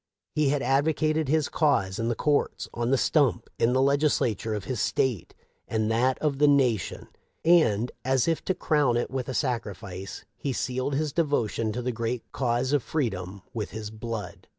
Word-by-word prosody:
He 150 -2 +2
had 145 -1 0
advocated 155 +3 +1
his 155 -1 +2
cause 100 - +1
in 115 - 0
the 120 - 0
courts, 145 +4 0
on 120 0 -1
the 135 - +3
stump, 130 -5 +1
in 120 +2 +3
the 130 - +3
Legislature 135 -6 +1
of 105 - -4
his 125 -1 -3
State 125 - 0 0.3
and 110 0 0
that 125 +3 +2
of 145 -3 -1
the 150 - +5
nation, 130 -8 +1 0.4
and, 125 -10 +4
as 130 +2 +2
if 165 -1 0
to 185 - 0
crown 145 -9 +2
it 120 - -2
with 130 -2 -3
a 130 - -3
sacrifice, 100 - -4
he 140 - -3
sealed 130 +3 -2
his 150 0 -1
devotion 120 -9 0
to 125 +2 -3
the 125 - -1
great 115 +1 -3
cause 125 +1 0
of 145 - +3
freedom 100 - -3
with 110 -3 -3
his 110 -1 -6
blood. 110 -4 -6
125 Hz, 180 wpm, -27 LUFS, 115-145 Hz, 0.4 s, the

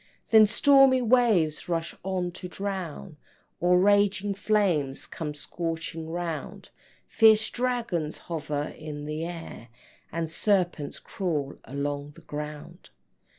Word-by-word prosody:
Then 220 -1 +8
stormy 270 +2 +5
waves 215 -11 +3
rush 165 -1 -1
on 185 -2 -2
to 180 +1 -7
drown, 185 -4 -5 0.4
Or 180 +1 +4
raging 205 +1 +3
flames 190 -10 +1
come 150 -3 -5
scorching 165 +1 -4
round, 170 -1 -5 0.3
Fierce 220 0 +5
dragons 235 -11 -1
hover 150 -3 -3
in 150 -1 -7
the 155 +1 -3
air, 165 -8 -8 0.4
And 165 0 -2
serpents 175 -3 0
crawl 155 -8 -3
along 145 +1 -4
the 170 - -14
ground. 150 +3 -8
175 Hz, 110 wpm, -27 LUFS, 155-205 Hz, 0.4 s, Then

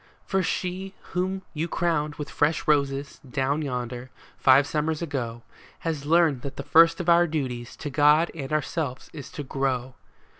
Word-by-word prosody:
For 190 0 +1
she 185 +2 -3 0.2
whom 190 +2 -1
you 160 +1 -2
crowned 155 -4 0
with 150 - -5
fresh 150 +2 +1
roses, 140 -2 +1
down 135 +3 -1
yonder, 125 -2 -4 0.3
five 135 +1 +5
summers 155 +1 -1
ago, 120 -7 -4 0.4
Has 155 -4 -3
learned 160 -5 +4
that 140 +1 -6
the 140 - -4
first 165 +3 +5
of 180 - -4
our 175 0 +5
duties 130 -7 -3
to 145 - -6
God 150 +4 +4
and 140 -4 -6
our 155 -1 +2
selves 140 -6 -4
is 145 -4 -8
to 145 - -5
grow. 130 -2 -2
150 Hz, 165 wpm, -26 LUFS, 135-165 Hz, 0.4 s, five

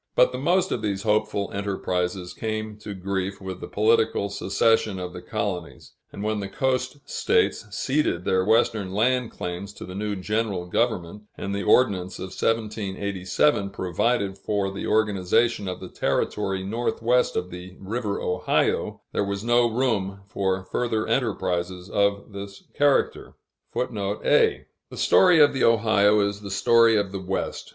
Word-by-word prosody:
But - - +5
the - - -4
most 185 +2 +2
of 115 - -1
these 100 -2 -2
hopeful 105 -2 0
enterprises 90 -2 -2
came 110 -1 -4
to 105 -1 -7
grief 95 +1 -3
with 95 -2 -7
the - - -6
political 110 -1 +2
secession 100 +1 +1
of 90 -1 -5
the 90 - -8
colonies; 90 -2 -4 0.2
and 100 - -7
when 110 0 -1
the 100 - -4
coast 130 +3 -1
States - - +1
ceded 115 - 0
their 95 0 +2
Western 110 -2 +2
land 125 +2 +2
claims 90 +3 -6
to - - -9
the 90 - -8
new 105 +1 -2
general 100 -1 -2
government, 105 -1 -1
and 100 - -4
the 100 - -2
Ordinance 95 -6 +2
of 95 - -6
1787 100 +1 0
provided 100 +2 -1
for 100 -2 -1
the 100 - -5
organization 105 +1 +2
of 90 - -4
the - - -8
Territory 95 -1 -1
Northwest 120 +3 0
of 90 0 -2
the 90 +1 -9
River 105 +1 -3
Ohio, 90 0 0
there - - 0
was 100 0 -3
no 120 0 +3
room 110 -5 -1
for 95 -1 -1
further 110 +1 -1
enterprises 90 -6 -1
of 100 +1 +1
this 100 0 -8
character.[A] 465 - 0 0.2
The - - -10
story 180 -3 +5
of 145 -1 +6
the 135 - 0
Ohio 105 -2 +4
is 100 0 -1
the 100 - -7
story 115 +3 +4
of 100 -2 0
the 95 -1 -5
West. 95 +1 -3
100 Hz, 150 wpm, -25 LUFS, 95-115 Hz, 0.2 s, of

